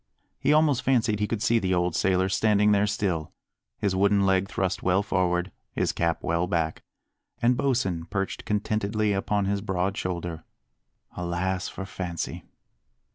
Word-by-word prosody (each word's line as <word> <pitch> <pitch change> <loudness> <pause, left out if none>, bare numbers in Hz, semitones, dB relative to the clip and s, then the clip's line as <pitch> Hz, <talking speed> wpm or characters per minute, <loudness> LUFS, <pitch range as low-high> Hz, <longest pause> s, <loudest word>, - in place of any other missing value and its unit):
He 140 - +2
almost 150 -4 +4
fancied 115 -5 +2
he 105 - +1
could 110 -1 -2
see 115 +1 +3
the 95 -3 0
old 90 -1 0
sailor 95 -1 +2
standing 105 +2 +3
there 105 0 +3
still, 95 -7 -1 0.5
his 100 -2 0
wooden 100 +1 +3
leg 95 0 +2
thrust 95 0 -1
well 95 +2 +2
forward, 90 -2 0 0.2
his - - 0
cap 85 -1 -1
well 85 +1 0
back, 80 -2 -1 0.6
and 120 +1 +3
Bosin 105 -11 0
perched 95 0 -3
contentedly 105 0 0
upon 100 +1 0
his 100 0 0
broad 95 -1 -1
shoulder. 85 -4 -4 0.7
Alas 90 +1 -2
for 95 - -6
fancy! 90 -3 -5
95 Hz, 150 wpm, -26 LUFS, 90-105 Hz, 0.7 s, almost